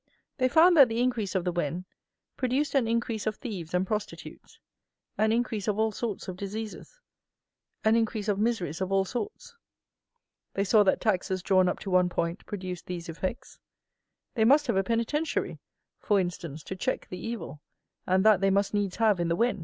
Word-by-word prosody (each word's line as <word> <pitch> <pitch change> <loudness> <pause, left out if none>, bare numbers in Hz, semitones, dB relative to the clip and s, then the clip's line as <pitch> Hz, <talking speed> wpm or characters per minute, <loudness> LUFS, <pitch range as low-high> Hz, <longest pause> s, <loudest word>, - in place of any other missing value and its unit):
They 255 0 +3
found 340 +5 +6
that 275 -5 +8
the 225 +1 -2
increase 240 -6 0
of 185 - +1
the 180 - 0
Wen 175 +1 -2 0.5
produced 265 +3 0
an 265 -5 +2
increase 230 -1 -1
of 215 - 0
thieves 190 - -6
and 180 +1 +1
prostitutes, 210 +1 -6 0.6
an 220 +1 +2
increase 225 -3 -1
of 210 -1 0
all 220 0 +2
sorts 215 -2 -4
of 185 - -5
diseases, 215 - -7 0.8
an 220 +1 +4
increase 225 -2 0
of 205 -1 +1
miseries 190 -8 -1
of 190 0 -2
all 195 0 +3
sorts; 420 - -5 1.0
they 195 - +1
saw 210 +2 +5
that 195 -2 +2
taxes 190 -3 0
drawn 185 -2 +4
up - - -2
to 195 - -5
one 180 -1 +4
point 170 +1 -3
produced 185 -3 -6
these 175 -1 -5
effects; 185 +7 -5 0.7
they 225 - +2
must 285 +6 +5
have 235 -6 0
a 195 - +2
"penitentiary," 235 +9 -1 0.4
for 205 -2 +2
instance, 170 -4 -4
to 190 - -6
check 255 +8 -2
the 180 - -6
evil, 225 -10 -6 0.5
and 185 +2 +2
that 215 -4 +6
they 195 - +3
must 200 +1 +1
needs 205 -3 0
have 215 -5 +3
in 170 - 0
the 170 - +1
Wen! 235 +2 +1
205 Hz, 185 wpm, -28 LUFS, 185-230 Hz, 1.0 s, that